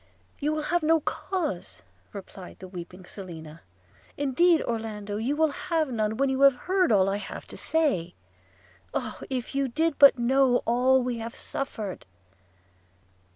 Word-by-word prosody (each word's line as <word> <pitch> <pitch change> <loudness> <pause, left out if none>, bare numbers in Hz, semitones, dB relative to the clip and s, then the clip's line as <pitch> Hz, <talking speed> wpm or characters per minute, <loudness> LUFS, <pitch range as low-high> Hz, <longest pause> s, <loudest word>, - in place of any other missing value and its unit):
'You 295 +2 0
will 310 0 -2
have 345 +3 +1
no 320 +1 +4
cause,' 310 - -3 0.3
replied 190 -1 -10
the 185 - -10
weeping 180 0 -9
Selina; 165 -5 -10 0.6
'indeed, 310 +4 +3
Orlando, 215 -3 -4
you 245 +7 -1
will 315 0 +2
have 320 -3 -1
none, 220 -2 -1
when 275 - +2
you 265 0 -1
have 275 -2 +7
heard 365 +2 +1
all 195 -3 +4
I 195 +1 0
have 205 - -7
to - - -9
say 275 - 0 0.4
– 90 -1 -31
Oh! - - -3
if 255 -2 -3
you 275 0 +1
did 315 +4 0
but 280 -2 +8
know 250 +1 +3
all 255 +2 +3
we 245 -2 -2
have 230 +1 -6
suffered!' 215 - -5
245 Hz, 155 wpm, -27 LUFS, 200-290 Hz, 0.6 s, but